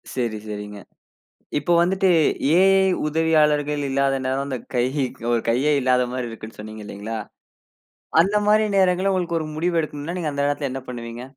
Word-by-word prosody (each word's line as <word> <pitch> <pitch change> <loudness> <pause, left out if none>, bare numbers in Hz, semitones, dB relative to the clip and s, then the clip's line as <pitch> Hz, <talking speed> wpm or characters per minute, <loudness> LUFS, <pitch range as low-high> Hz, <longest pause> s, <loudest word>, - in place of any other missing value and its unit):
சரி, 115 -4 -1
சரிங்க. 105 0 -6 0.8
இப்ப 175 - -4
வந்துட்டு 190 +2 +2 0.4
ஏ 170 +4 +5 0.2
ஐ - - +3 0.2
உதவியாளர்கள் 150 -2 +2
இல்லாத 135 0 +1
நேரம் 135 +1 0
அந்தக் 130 -4 -5
கையு 130 +4 0 0.3
ஒரு 120 -1 +2
கையே 130 +6 +2
இல்லாத 125 -1 +2
மாரி 125 -2 -3
இருக்குன்னு 110 -1 -10
சொன்னீங்க 110 0 -8
இல்லீங்களா, 105 +2 -6 1.0
அந்த 195 +5 +3
மாரி 215 +1 +4
நேரங்கள்ல 185 +1 +3
உங்களுக்கு 175 -2 -1
ஒரு 155 - -4
முடிவு 170 +2 0
எடுக்கணும்னா 155 +3 -5
நீங்க 155 -3 -2
அந்த 140 0 0
நேத்துல 145 -2 -2
என்ன 135 -1 -6
பண்ணுவீங்க? 120 -1 -7
140 Hz, 160 wpm, -22 LUFS, 120-165 Hz, 1.0 s, ஏ